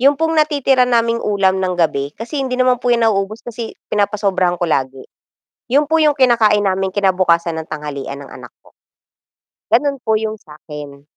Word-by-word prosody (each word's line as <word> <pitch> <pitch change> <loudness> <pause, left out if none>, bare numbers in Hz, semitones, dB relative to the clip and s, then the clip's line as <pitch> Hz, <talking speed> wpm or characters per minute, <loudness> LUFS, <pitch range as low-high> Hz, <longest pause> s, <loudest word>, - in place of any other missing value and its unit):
yun 280 +3 +5
pong 325 0 0
natitira 285 -4 +2
naming 235 -1 +1
ulam 195 -2 +1
ng 185 -1 -1
gabi, 140 -4 0
kasi 260 +6 -5
hindi 255 -1 -3
naman 255 -1 +3
po 245 - +1
yan 235 -1 +3
nauubos 210 +1 -1
kasi 235 -1 -6 0.2
pinapasobrahan 200 -4 0
ko 175 - -1
lagi, 135 -4 -1 0.7
yun 290 +3 +3
po 320 +2 +2
yung 300 -2 +3
kinakain 220 -5 +4
namin 190 0 0
kinabukasan 180 -4 +2
ng 160 - -10
tanghalian 140 -2 -6
ng - - -14
anak - - -11
ko. - - -22 1.0
Ganun 285 -2 +2
po 220 -2 +1
yung 220 0 -3
sakin. 150 -3 -11
210 Hz, 170 wpm, -17 LUFS, 170-250 Hz, 1.0 s, yun